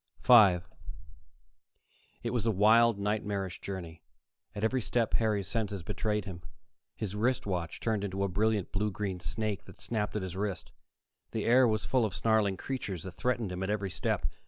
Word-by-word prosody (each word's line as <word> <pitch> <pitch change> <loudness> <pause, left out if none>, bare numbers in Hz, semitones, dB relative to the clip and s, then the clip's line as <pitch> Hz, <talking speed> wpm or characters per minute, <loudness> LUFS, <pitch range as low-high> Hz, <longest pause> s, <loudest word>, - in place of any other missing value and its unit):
5 95 -8 +6 1.6
It - - -1
was 120 -2 0
a - - +4
wild, 110 +2 +5
nightmarish 100 -2 -2
journey. 85 -4 -6 0.5
At 105 - -4
every 125 +3 +1
step, 115 0 0
Harry's 105 -4 +1
senses 105 -5 -2
betrayed 105 +3 -1
him: 90 -3 -7 0.5
his 105 -2 -4
wrist 120 +4 +1
watch 90 -5 -3
turned 110 -3 -1
into 100 -1 -2
a - - +2
brilliant 105 +1 0
blue 105 +1 0
green 95 -2 -3
snake 105 +2 -3
that - - -14
snapped 105 -3 -2
at 105 - -1
his 90 -1 -5
wrist; 95 -3 -3 0.6
the - - -2
air 125 +2 +6
was 110 -2 0
full 130 -2 +2
of 105 -4 -1
snarling 110 -4 +2
creatures 100 -10 -4
that 95 - -6
threatened 120 -2 -1
him 90 +1 -4
at 95 - -2
every 100 -2 -1
step. 90 -1 -1
105 Hz, 175 wpm, -30 LUFS, 95-110 Hz, 1.6 s, 5